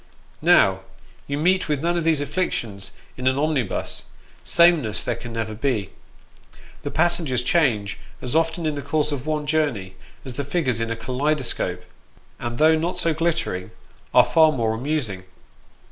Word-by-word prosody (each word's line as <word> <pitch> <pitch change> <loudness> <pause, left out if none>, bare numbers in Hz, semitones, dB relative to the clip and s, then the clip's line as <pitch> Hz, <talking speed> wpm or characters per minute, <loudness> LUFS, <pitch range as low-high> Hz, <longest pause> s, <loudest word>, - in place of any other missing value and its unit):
Now, 95 -1 +5 0.5
you 140 - -2
meet 185 +3 +2
with 150 -1 0
none 170 +1 +1
of 170 - 0
these 160 -3 +2
afflictions 120 - -2 0.3
in 130 0 -2
an 130 +1 +3
omnibus; 145 -7 -1 0.4
same 170 -1 +5
ness 110 -2 -2
there 120 - -1
can 120 +1 -8
never 115 -1 -3
be. 110 -4 -1 0.9
The - - -4
passengers 160 -7 +1
change 120 -10 +1 0.2
as 125 - -4
often 165 +1 +1
in 155 - +1
the 145 - -4
course 150 +2 0
of 140 0 -4
one 155 -1 -1
journey 145 -12 0 0.3
as 130 - -5
the 140 - -3
figures 140 -5 0
in 115 0 -2
a 115 - -1
kaleidoscope, 125 -7 -1 0.6
and 120 0 -4
though 155 +3 +5
not 165 +3 -1
so 165 - +2
glittering, 160 - -1 0.4
are - - +6
far 160 -1 +5
more 115 -6 0
amusing. 120 -6 -2
140 Hz, 160 wpm, -23 LUFS, 115-160 Hz, 0.9 s, are